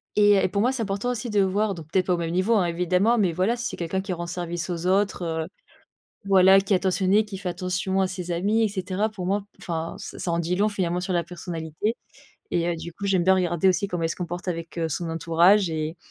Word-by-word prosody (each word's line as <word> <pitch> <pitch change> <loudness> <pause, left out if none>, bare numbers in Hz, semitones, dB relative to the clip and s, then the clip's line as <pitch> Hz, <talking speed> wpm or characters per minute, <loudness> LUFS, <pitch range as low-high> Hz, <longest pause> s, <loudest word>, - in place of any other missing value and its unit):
Et 205 0 +5
et - - +3
pour 200 +1 0
moi, 250 +4 +3
c'est 260 -3 -3
important 200 +4 -2
aussi 240 0 -4
de 210 -1 +2
voir 200 +2 +1
donc, 160 -3 -10
peut 190 - +3
être, 185 - -2
au 175 - +3
même 165 -1 -2
niveau, 185 +6 +2
hein, 190 -5 +3
évidemment 180 +7 +2
mais 190 -5 +2
voilà, 185 +8 +1
si 240 - -5
c'est - - -6
quelqu'un 175 +3 -2
qui 195 -1 -4
rend 175 0 -5
service 175 0 -4
aux 175 0 -3
autres, 195 -1 +1
heu, 160 -1 -2 0.8
voilà, 190 0 +6
qui 195 +1 -2
est 190 - +6
attentionné, 190 +3 +2
qui 205 -2 -8
fait 185 -1 -4
attention 185 +2 -1
à 190 - +3
ses 180 -1 -6
amis 205 +6 +1
et 220 - +3
cetera. 195 +1 -2
Pour 195 -5 -6
moi, 200 +1 0 0.2
enfin 165 -1 -4
ce - - -8
ça 175 - -3
en 170 - 0
dit 170 +2 -1
long 210 +2 +3
finalement 180 -4 -1
sur 185 +1 -3
la 170 -2 +1
personnalité 170 +4 -4 0.5
et 170 -1 0
heu, 170 - 0
du 170 +1 -7
coup, 200 - -8
j'aime 185 -3 +2
bien 190 0 +5
regarder 180 0 +2
aussi 185 +2 +1
comment 175 -3 -3
elle - - +1
se - - -4
comporte 175 +1 -5
avec, 165 0 -4
heu, 165 -1 0
son 165 +2 -3
entourage 170 +4 +3
et 155 +1 -3
185 Hz, 255 wpm, -25 LUFS, 170-200 Hz, 0.8 s, voilà